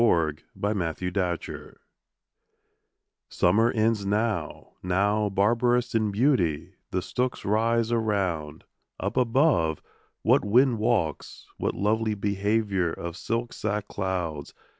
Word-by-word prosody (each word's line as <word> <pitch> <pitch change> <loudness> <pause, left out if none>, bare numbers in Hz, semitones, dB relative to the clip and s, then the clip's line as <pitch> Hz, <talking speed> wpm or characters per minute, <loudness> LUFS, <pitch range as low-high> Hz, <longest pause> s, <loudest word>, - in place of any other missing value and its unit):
14 80 -9 +2 0.2
Hurrahing 100 -6 -1
in 90 -1 -3 0.4
Harvest - - -11 1.5
SUMMER 110 +6 +3
ends 110 -2 +1
now; 105 -4 -2
now, 100 +3 +1
barbarous 120 +5 +2
in 110 -2 +1
beauty, 100 - +1 0.2
the 90 -1 -2
stooks 125 +5 -2
rise 115 +2 +1
Around; 95 -9 -1 0.4
up - - -3
above, 125 - +2 0.4
what - - +4
wind 120 +3 +3
walks! 100 - -1
what - - -2
lovely 110 +1 0
behaviour 100 -2 0
Of 85 +1 -6
silk 115 +4 -3
sack 105 -1 -3
clouds! 90 -6 -3
105 Hz, 110 wpm, -26 LUFS, 90-115 Hz, 1.5 s, what